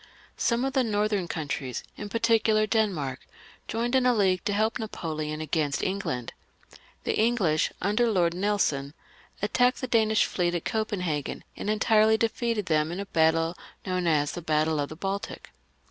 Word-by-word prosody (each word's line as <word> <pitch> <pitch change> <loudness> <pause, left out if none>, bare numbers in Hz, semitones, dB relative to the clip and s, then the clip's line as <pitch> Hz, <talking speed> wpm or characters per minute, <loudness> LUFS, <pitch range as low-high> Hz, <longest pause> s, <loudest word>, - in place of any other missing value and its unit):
Some 235 +2 +1
of 270 - -2
the 265 -1 +3
northern 210 -4 0
countries, 140 -5 -4
in 205 - -7
particular 225 -1 +3
Denmark, 185 - 0 0.5
joined 235 +2 -2
in 260 -1 +4
a 250 - +4
league 190 -4 +2
to 205 - 0
help 220 +2 +1
Napoleon 155 -7 -4
against 150 -2 -1
England. 185 - -2 0.7
The - - 0
English, 215 -9 +2
under 215 +5 +2
Lord 175 -5 +2
Nelson, 175 -7 0 0.5
attacked 245 +4 +2
the 255 - -2
Danish 220 -3 +3
fleet 175 -1 -1
at 170 - -3
Copenhagen, 180 - -2
and - - -4
entirely 215 +1 +4
defeated 230 -2 -1
them 155 -2 +1
in 175 - -4
a 200 - -3
battle 165 -1 +2 0.3
known 185 -2 -1
as 145 -3 +2
the 175 - -6
Battle 155 -1 +1
of 145 - -1
the 155 - -8
Baltic. 195 +4 -5
195 Hz, 160 wpm, -27 LUFS, 160-220 Hz, 0.7 s, in